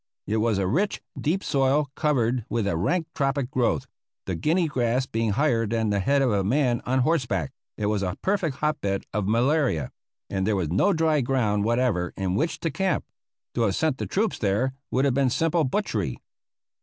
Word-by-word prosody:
It 110 Hz, -, -1 dB
was 110 Hz, -1 st, +1 dB
a 95 Hz, -, 0 dB
rich, 175 Hz, -, 0 dB, 0.2 s
deep 175 Hz, +6 st, -1 dB
soil, 135 Hz, +1 st, +1 dB
covered 125 Hz, -6 st, +1 dB
with 115 Hz, -3 st, 0 dB
a 100 Hz, -, 0 dB
rank 160 Hz, -, 0 dB
tropic 135 Hz, -2 st, -1 dB
growth, 125 Hz, -2 st, +1 dB, 0.4 s
the 95 Hz, -, -2 dB
guinea 165 Hz, -, +1 dB
grass 125 Hz, -2 st, 0 dB
being 115 Hz, -4 st, -1 dB
higher 115 Hz, -3 st, +2 dB
than 110 Hz, -1 st, 0 dB
the 100 Hz, -, +1 dB
head 140 Hz, +7 st, +2 dB
of 125 Hz, -, +2 dB
a 100 Hz, -2 st, +1 dB
man 125 Hz, +2 st, +1 dB
on 130 Hz, +1 st, +2 dB
horseback. 125 Hz, -, 0 dB, 0.2 s
It 105 Hz, -, -2 dB
was 105 Hz, -1 st, 0 dB
a 95 Hz, 0 st, -2 dB
perfect 190 Hz, -8 st, 0 dB
hotbed 140 Hz, -10 st, -1 dB
of 100 Hz, -1 st, -1 dB
malaria, 120 Hz, -, +1 dB, 0.4 s
and 95 Hz, 0 st, -2 dB
there 110 Hz, -, +2 dB
was 90 Hz, -6 st, -1 dB
no 200 Hz, -, +3 dB
dry 160 Hz, -4 st, +2 dB
ground 110 Hz, -5 st, +1 dB
whatever 115 Hz, -7 st, +1 dB
in 95 Hz, -2 st, -1 dB
which 155 Hz, -, -1 dB
to 165 Hz, -, -1 dB
camp. 190 Hz, +6 st, 0 dB, 0.5 s
To 120 Hz, -, -1 dB
have 100 Hz, -4 st, +2 dB
sent 155 Hz, -5 st, 0 dB
the -, -, -3 dB
troops 215 Hz, +3 st, 0 dB
there 110 Hz, +6 st, +1 dB, 0.2 s
would 130 Hz, +2 st, +1 dB
have 135 Hz, -, +2 dB
been 135 Hz, 0 st, +2 dB
simple 165 Hz, +4 st, +1 dB
butchery. 115 Hz, -, -1 dB
125 Hz, 195 wpm, -25 LUFS, 105-150 Hz, 0.5 s, no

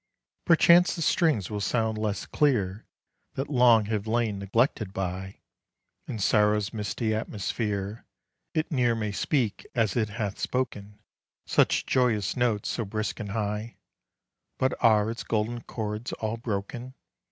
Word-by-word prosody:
Perchance 170 Hz, +1 st, +6 dB
the 170 Hz, -, -5 dB
strings 150 Hz, -, +2 dB
will 105 Hz, -1 st, -3 dB
sound 110 Hz, +3 st, 0 dB
less 110 Hz, -1 st, -2 dB
clear, 110 Hz, -9 st, 0 dB, 0.5 s
That 135 Hz, +3 st, -3 dB
long 120 Hz, -5 st, +5 dB
have 105 Hz, 0 st, -2 dB
lain 110 Hz, -3 st, 0 dB
neglected 105 Hz, 0 st, 0 dB
by 95 Hz, 0 st, -4 dB, 0.7 s
In -, -, -4 dB
sorrow's 105 Hz, 0 st, +2 dB
misty 110 Hz, +1 st, -2 dB
atmosphere; 105 Hz, -1 st, -3 dB, 0.5 s
It 155 Hz, 0 st, 0 dB
ne'er 125 Hz, -5 st, +2 dB
may 105 Hz, -2 st, -2 dB
speak 115 Hz, 0 st, 0 dB
as 110 Hz, -5 st, +1 dB
it 110 Hz, -3 st, +1 dB
hath 105 Hz, -2 st, -4 dB
spoken 105 Hz, -5 st, -3 dB, 0.5 s
Such -, -, +2 dB
joyous 115 Hz, -7 st, +1 dB
notes 120 Hz, -5 st, 0 dB
so 120 Hz, -, -1 dB
brisk 110 Hz, +2 st, -3 dB
and 105 Hz, -3 st, -5 dB
high; 105 Hz, +2 st, -3 dB, 0.8 s
But 130 Hz, 0 st, +1 dB
are 110 Hz, -1 st, +4 dB
its 115 Hz, -, -6 dB
golden 115 Hz, +2 st, -1 dB
chords 110 Hz, +1 st, -4 dB
all 110 Hz, +1 st, -3 dB
broken? 115 Hz, +3 st, -5 dB
110 Hz, 135 wpm, -27 LUFS, 105-120 Hz, 0.8 s, Perchance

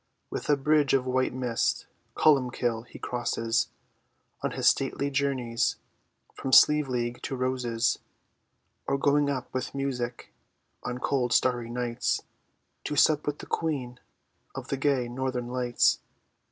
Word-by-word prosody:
With -, -, -4 dB
a 145 Hz, -, +5 dB
bridge 150 Hz, 0 st, +3 dB
of 130 Hz, -1 st, +1 dB
white 130 Hz, 0 st, +1 dB
mist 125 Hz, -2 st, -1 dB, 0.3 s
Columbkill 125 Hz, -5 st, +2 dB
he -, -, -11 dB
crosses, 115 Hz, -1 st, -1 dB, 0.7 s
On -, -, 0 dB
his -, -, -3 dB
stately 140 Hz, +1 st, +2 dB
journeys 135 Hz, -4 st, 0 dB, 0.6 s
From 135 Hz, -, -5 dB
Slieveleague 125 Hz, -5 st, +4 dB
to 135 Hz, -, -4 dB
Rosses; 125 Hz, -3 st, 0 dB, 0.9 s
Or 140 Hz, -, +1 dB
going 145 Hz, +1 st, +3 dB
up 130 Hz, -3 st, -4 dB
with 130 Hz, +1 st, -3 dB
music 125 Hz, -3 st, -3 dB, 0.5 s
On 125 Hz, 0 st, -3 dB
cold 125 Hz, -2 st, 0 dB
starry 120 Hz, -2 st, +2 dB
nights, 120 Hz, 0 st, -1 dB, 0.6 s
To 150 Hz, -, -2 dB
sup 150 Hz, +1 st, +4 dB
with 145 Hz, 0 st, -1 dB
the -, -, -9 dB
Queen 130 Hz, -7 st, -2 dB, 0.6 s
Of -, -, -7 dB
the 140 Hz, -, -1 dB
gay 135 Hz, -3 st, +1 dB
Northern 125 Hz, 0 st, -3 dB
Lights. 125 Hz, -1 st, +2 dB
130 Hz, 130 wpm, -28 LUFS, 120-140 Hz, 0.9 s, a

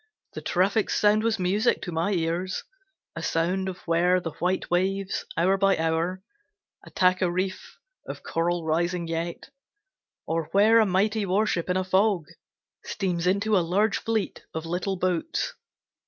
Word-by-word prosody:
The -, -, -6 dB
traffic's 195 Hz, +4 st, +1 dB
sound 210 Hz, +1 st, +4 dB
was 225 Hz, 0 st, +1 dB
music 200 Hz, +5 st, +1 dB
to 175 Hz, -, -4 dB
my 165 Hz, +4 st, 0 dB
ears; 175 Hz, +2 st, -1 dB, 0.5 s
A -, -, -5 dB
sound 185 Hz, +4 st, 0 dB
of 185 Hz, -, -6 dB
where 175 Hz, +2 st, +3 dB
the 165 Hz, -2 st, -5 dB
white 180 Hz, +1 st, -1 dB
waves, 190 Hz, +2 st, 0 dB
hour 185 Hz, +4 st, +3 dB
by 195 Hz, 0 st, +3 dB
hour, 165 Hz, +3 st, -1 dB, 0.6 s
Attack 185 Hz, 0 st, +1 dB
a 185 Hz, -, +2 dB
reef 185 Hz, +2 st, -3 dB, 0.3 s
of -, -, -7 dB
coral 170 Hz, 0 st, -1 dB
rising 170 Hz, +2 st, 0 dB
yet; 165 Hz, +1 st, -4 dB, 0.7 s
Or 165 Hz, 0 st, -1 dB
where 215 Hz, +3 st, +6 dB
a 220 Hz, -, +4 dB
mighty 205 Hz, +3 st, +1 dB
warship 190 Hz, -2 st, 0 dB
in 180 Hz, -, +2 dB
a 185 Hz, -, 0 dB
fog, 190 Hz, -2 st, +2 dB, 0.6 s
Steams 180 Hz, -3 st, -2 dB
into 200 Hz, +3 st, +2 dB
a -, -, +5 dB
large 195 Hz, +6 st, +1 dB
fleet 225 Hz, -2 st, -2 dB
of 160 Hz, 0 st, -3 dB
little 180 Hz, +3 st, -2 dB
boats. 185 Hz, -, -1 dB
185 Hz, 155 wpm, -26 LUFS, 170-200 Hz, 0.7 s, where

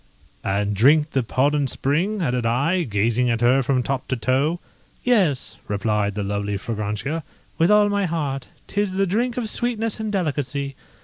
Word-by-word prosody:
"And 100 Hz, +1 st, 0 dB
drink 150 Hz, +8 st, +4 dB
the 135 Hz, -, +1 dB
Podhon 140 Hz, +4 st, +1 dB
spring?" 175 Hz, -, 0 dB
added 125 Hz, -4 st, 0 dB
I, 140 Hz, +11 st, +1 dB
gazing 115 Hz, -1 st, +1 dB
at 115 Hz, 0 st, 0 dB
her 125 Hz, +3 st, +4 dB
from 130 Hz, 0 st, +1 dB
top 135 Hz, 0 st, -2 dB
to 130 Hz, -, 0 dB
toe. 135 Hz, +8 st, +1 dB, 0.4 s
"Yes," 190 Hz, -, +1 dB
replied 105 Hz, 0 st, 0 dB
the 105 Hz, -, -2 dB
lovely 100 Hz, 0 st, -2 dB
Fragrantia, 110 Hz, +9 st, -3 dB, 0.4 s
"with 165 Hz, -, +4 dB
all 210 Hz, 0 st, +6 dB
my 200 Hz, -2 st, +1 dB
heart; 145 Hz, -6 st, -2 dB, 0.2 s
'tis 205 Hz, -2 st, -1 dB
the 195 Hz, +1 st, +2 dB
drink 235 Hz, +6 st, 0 dB
of 240 Hz, -3 st, -1 dB
sweetness 225 Hz, -1 st, -1 dB
and 220 Hz, -1 st, -2 dB
delicacy. 145 Hz, -6 st, -2 dB
140 Hz, 165 wpm, -23 LUFS, 115-185 Hz, 0.4 s, all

